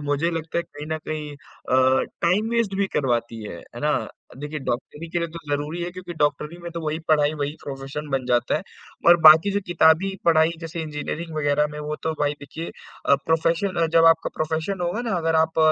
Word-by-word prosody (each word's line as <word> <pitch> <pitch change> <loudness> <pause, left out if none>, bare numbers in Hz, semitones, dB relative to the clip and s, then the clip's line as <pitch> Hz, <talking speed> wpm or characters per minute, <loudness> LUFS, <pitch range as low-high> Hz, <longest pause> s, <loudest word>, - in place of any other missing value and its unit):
मुझे 145 +4 0
लगता 165 0 -3
है - - 0
कहीं 145 +1 -10
न - - -3
कहीं 150 -1 -4 0.4
अ, 130 +1 +4 0.2
टाइम 185 +6 +2
वेस्ट 230 -4 0
भी 200 0 +1
करवाती 120 -4 0
है। 105 - -7
है 120 - -12
ना? 150 0 +2 0.5
देखिए 150 +2 -5
डॉक्टरी 150 +6 -4
के 175 - 0
लिए 170 -1 -2
तो 165 - -8
ज़रूरी 150 +4 -2
है 175 - -3
क्योंकि 180 -1 -8
डॉक्टरी 150 +2 -1
में 170 - -6
तो 170 - -4
वही 155 +1 -1
पढ़ाई, 150 -1 +4
वही 145 0 -3
प्रोफेशन 135 +2 -6
बन 130 -2 -1
जाता 120 -1 +2
है - - -4 0.5
और 175 - +9
बाकी 160 +5 +8
जो 205 - +1
किताबी 175 +3 +3
पढ़ाई 160 -1 +5
जैसे 165 +1 -5
इंजीनियरिंग 155 +2 -5
वग़ैरह 150 0 +2
में, 150 - -7
वो 150 0 -4
तो 160 - 0
भाई 145 0 +2
देखिए 155 +4 -7 0.4
अ, - - +7
प्रोफेशन 165 +4 +1
अ, - - +2
जब 165 - +7
आपका 165 - -6
प्रोफेशन 160 +4 -2
होगा 175 +6 -1
ना - - +1
अगर 165 -1 +1
आप 160 0 -2
155 Hz, 210 wpm, -23 LUFS, 145-170 Hz, 0.5 s, और